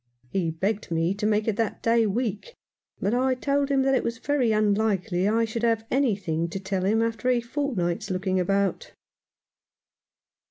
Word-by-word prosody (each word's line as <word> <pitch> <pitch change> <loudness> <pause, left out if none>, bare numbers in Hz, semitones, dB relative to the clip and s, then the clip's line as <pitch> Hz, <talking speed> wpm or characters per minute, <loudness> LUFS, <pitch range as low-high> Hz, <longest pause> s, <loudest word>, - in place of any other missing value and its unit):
He 180 -4 0
begged 195 +6 -2
me 165 +2 +1
to 210 +1 -2
make 215 0 +1
it 220 -2 0
that 225 -2 -2
day 230 -1 +3
week, 225 - -3 0.4
but 205 - 0
I 255 +1 +2
told 280 +2 0
him 270 -1 +2
that 270 0 +2
it 260 - +2
was 230 0 -2
very 260 -3 +1
unlikely 205 -3 +1
I 225 +2 +2
should 225 +1 -4
have 225 -1 +1
any 260 -5 +2
thing 170 -3 -2
to 195 - -4
tell 190 -1 -2
him 220 +3 +2
after 230 +1 -1
a 250 -1 +3
fortnight's 235 - -2
looking 185 0 0
about. 200 - 0
215 Hz, 175 wpm, -25 LUFS, 190-240 Hz, 0.4 s, day